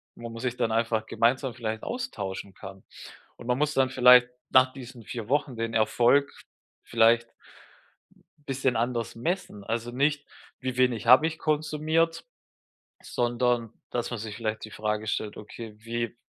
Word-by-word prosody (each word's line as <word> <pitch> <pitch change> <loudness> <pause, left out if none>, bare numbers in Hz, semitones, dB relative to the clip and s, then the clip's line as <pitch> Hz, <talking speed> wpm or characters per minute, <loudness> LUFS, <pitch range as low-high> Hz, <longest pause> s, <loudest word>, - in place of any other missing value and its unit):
wo 115 0 -8
man 115 0 -8
sich 125 -1 -2
dann 115 - 0
einfach 110 -1 0
gemeinsam 125 +3 +1
vielleicht 110 -2 -4
austauschen 100 - -5
kann. 95 -1 -11 0.6
Und 120 - -12
man 125 0 +1
muss 150 0 +1
dann 130 -1 +3
vielleicht 125 -1 +7 0.2
nach 130 0 +5
diesen 125 -3 -11
4 115 -3 -6
Wochen 140 -2 0
den 115 0 -3
Erfolg 120 +6 +3 0.5
vielleicht 115 +1 +3 1.2
bisschen 135 -2 0
anders 115 0 -1
messen. 120 - -3
Also 115 +2 -3
nicht: 145 +3 0 0.3
„Wie 130 -1 -3
wenig 125 -3 +1
habe 130 +6 +7
ich 160 0 -4
konsumiert?“, 155 +2 0 0.8
sondern 120 -1 0 0.2
dass 120 0 -2
man 120 - -4
sich 110 -1 -6
vielleicht 110 -1 -3
die 110 - -8
Frage 105 0 -2
stellt: 105 -1 -2
„Okay, 110 +1 -9
wie” 115 +1 -4
120 Hz, 150 wpm, -27 LUFS, 115-130 Hz, 1.2 s, vielleicht